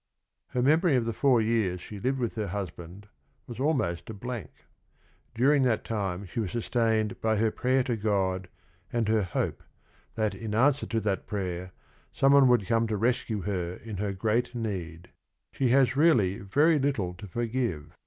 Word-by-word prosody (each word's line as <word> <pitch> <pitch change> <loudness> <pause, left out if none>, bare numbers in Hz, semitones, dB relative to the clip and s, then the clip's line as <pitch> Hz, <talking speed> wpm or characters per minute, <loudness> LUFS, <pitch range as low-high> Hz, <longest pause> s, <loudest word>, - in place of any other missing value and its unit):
Her 125 - -1
memory 155 +3 +4
of 120 -2 +1
the 115 - -2
four 125 0 +3
years 110 -5 0
she 100 +3 -9
lived 130 +6 0
with 120 -3 -2
her 110 -2 -3
husband 95 0 -6 0.4
was 120 0 -9
almost 130 - 0
a 110 - -6
blank. 120 0 -6 0.9
During 135 +5 +4
that 125 -4 +1
time 100 -3 -3
she 115 +6 -5
was 105 -5 -1
sustained 110 -1 0
by 110 -1 +1
her 110 +1 +2
prayer 130 +3 +1
to 125 -2 -1
God 95 -4 -1 0.4
and 115 -2 0
her 110 0 +3
hope, 90 -3 -2 0.5
that 110 -3 0
in 105 +2 -5
answer 140 +4 +3
to 115 - 0
that 100 -3 -2
prayer, 90 -3 -4 0.4
some 135 0 +4
one 140 -2 +7
would 120 -5 +3
come 115 +1 +1
to 110 -1 -1
rescue 115 -1 0
her 90 -3 -2
in 110 -2 -8
her 100 +1 -1
great 110 +6 -1
need. 90 -7 -5 0.4
Sh - - -14
e 130 - +4
has 130 -1 +4
really 120 - +3
very 150 +10 +3
little 135 -11 -1
to 90 +3 -10
forgive. 115 - -3
110 Hz, 180 wpm, -28 LUFS, 95-125 Hz, 0.9 s, one